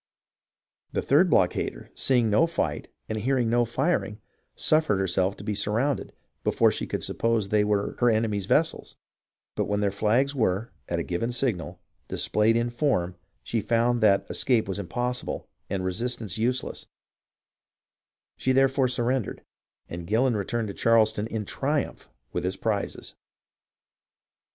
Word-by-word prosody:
The -, -, -1 dB
third -, -, +4 dB
blockader, -, -, +1 dB
seeing 125 Hz, -4 st, +2 dB
no 135 Hz, +11 st, +4 dB
fight 85 Hz, -, -2 dB, 0.2 s
and 110 Hz, 0 st, -3 dB
hearing 125 Hz, 0 st, +1 dB
no 120 Hz, 0 st, +3 dB
firing, 120 Hz, -3 st, -1 dB, 0.4 s
suffered 155 Hz, -10 st, +3 dB
herself 95 Hz, +1 st, 0 dB
to -, -, -9 dB
be 105 Hz, 0 st, -2 dB
sur 105 Hz, +1 st, 0 dB
rounded, 135 Hz, +5 st, 0 dB, 0.3 s
before -, -, +3 dB
she -, -, -3 dB
could -, -, -3 dB
suppose 115 Hz, -3 st, 0 dB
they 105 Hz, 0 st, +3 dB
were 105 Hz, -1 st, 0 dB
her 120 Hz, -, +4 dB
enemy's 110 Hz, -3 st, 0 dB
vessels; 160 Hz, +7 st, +1 dB, 0.6 s
but -, -, 0 dB
when 105 Hz, 0 st, -1 dB
their 100 Hz, -1 st, +1 dB
flags 115 Hz, +8 st, +1 dB
were, 110 Hz, -4 st, 0 dB, 0.2 s
at 85 Hz, -, -1 dB
a 85 Hz, -, -1 dB
given 95 Hz, +8 st, -2 dB
signal, 95 Hz, -9 st, -1 dB, 0.3 s
dis -, -, 0 dB
played 110 Hz, +2 st, +3 dB
in 120 Hz, +1 st, 0 dB
form, 120 Hz, -9 st, 0 dB, 0.3 s
she 115 Hz, -, -1 dB
found 120 Hz, +3 st, +1 dB
that 100 Hz, -2 st, +4 dB
escape 120 Hz, -6 st, +2 dB
was 95 Hz, +1 st, -2 dB
impossible 120 Hz, +7 st, -3 dB, 0.2 s
and 95 Hz, -1 st, -2 dB
resistance 110 Hz, +1 st, -2 dB
useless; 125 Hz, +3 st, -1 dB, 1.5 s
she 130 Hz, -, +1 dB
therefore 135 Hz, 0 st, +3 dB
surrendered, 125 Hz, -1 st, -1 dB, 0.4 s
and 85 Hz, 0 st, -7 dB
Gillon 120 Hz, +3 st, +2 dB
returned 105 Hz, +1 st, -2 dB
into -, -, -8 dB
Charleston 110 Hz, -2 st, +3 dB
in 110 Hz, -2 st, -4 dB
triumph 140 Hz, +7 st, -2 dB, 0.2 s
with -, -, -2 dB
his 90 Hz, +1 st, -2 dB
prizes. 105 Hz, -3 st, -3 dB
110 Hz, 145 wpm, -26 LUFS, 100-125 Hz, 1.5 s, third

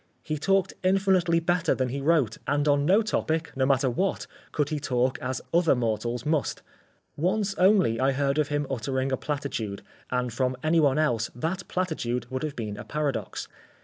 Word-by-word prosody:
He 155 Hz, -1 st, -3 dB
talked 195 Hz, +3 st, +2 dB
infinitely 185 Hz, -3 st, +3 dB
better 175 Hz, 0 st, +1 dB
than 130 Hz, -1 st, -1 dB
he 140 Hz, +3 st, -3 dB
wrote, 140 Hz, -7 st, +2 dB
and 145 Hz, +1 st, +1 dB
on 145 Hz, 0 st, +3 dB
no 200 Hz, +5 st, +5 dB
topic, 165 Hz, -6 st, -1 dB
no 130 Hz, -1 st, +1 dB
matter 135 Hz, 0 st, +3 dB
what, 185 Hz, +11 st, -1 dB, 0.3 s
could 150 Hz, -1 st, 0 dB
he 155 Hz, -2 st, -2 dB
talk 130 Hz, -2 st, 0 dB
as 130 Hz, 0 st, -3 dB
other 170 Hz, -4 st, +4 dB
mortals 120 Hz, 0 st, -2 dB
must. 155 Hz, -1 st, 0 dB, 0.5 s
Once 195 Hz, +5 st, 0 dB
only 185 Hz, -, +4 dB
I 135 Hz, +1 st, +3 dB
heard 140 Hz, +2 st, +1 dB
of 150 Hz, -, +2 dB
him 145 Hz, 0 st, -1 dB
uttering 130 Hz, +1 st, -2 dB
a 130 Hz, -, +1 dB
platitude 140 Hz, -9 st, -4 dB, 0.3 s
and 125 Hz, -2 st, -1 dB
from 130 Hz, +1 st, 0 dB
any 160 Hz, +2 st, +3 dB
one 145 Hz, -2 st, +3 dB
else 120 Hz, -8 st, +1 dB
that 170 Hz, +8 st, -3 dB
platitude 125 Hz, -, -2 dB
would 130 Hz, -, -2 dB
have 155 Hz, -2 st, -3 dB
been 105 Hz, -3 st, -4 dB
a -, -, -6 dB
paradox. 145 Hz, +3 st, -3 dB
145 Hz, 180 wpm, -27 LUFS, 125-165 Hz, 0.5 s, no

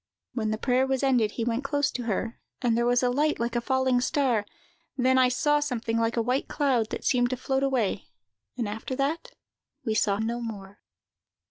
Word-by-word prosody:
"When 220 Hz, -3 st, -1 dB
the 215 Hz, -, -1 dB
prayer 255 Hz, +3 st, +2 dB
was 265 Hz, 0 st, 0 dB
ended, 245 Hz, -6 st, +2 dB
he 235 Hz, -, -2 dB
went 235 Hz, +3 st, -1 dB
close 285 Hz, +1 st, 0 dB
to 245 Hz, -, -4 dB
her, 225 Hz, +2 st, -2 dB, 0.2 s
and 240 Hz, -3 st, +1 dB
there 235 Hz, +1 st, +1 dB
was 245 Hz, +1 st, +3 dB
a 250 Hz, -, +3 dB
light 300 Hz, +4 st, +1 dB
like 235 Hz, +1 st, -2 dB
a 240 Hz, -, +1 dB
falling 260 Hz, 0 st, +2 dB
star; 250 Hz, -6 st, +1 dB, 0.5 s
then 260 Hz, 0 st, +3 dB
I 255 Hz, -1 st, +5 dB
saw 295 Hz, +4 st, +2 dB
something 235 Hz, -5 st, -1 dB
like 230 Hz, +1 st, 0 dB
a 230 Hz, -, +2 dB
white 250 Hz, +4 st, 0 dB
cloud, 260 Hz, -7 st, +1 dB
that -, -, -5 dB
seemed 245 Hz, -1 st, +3 dB
to 255 Hz, -, -2 dB
float 265 Hz, +1 st, -1 dB
away: 255 Hz, -8 st, 0 dB, 0.5 s
and 235 Hz, -4 st, -1 dB
after 220 Hz, +5 st, -4 dB
that, 315 Hz, -, -2 dB, 0.5 s
we 220 Hz, -, 0 dB
saw 205 Hz, -2 st, +2 dB
no 230 Hz, +3 st, -2 dB
more." 205 Hz, -3 st, -7 dB
245 Hz, 205 wpm, -27 LUFS, 230-265 Hz, 0.5 s, I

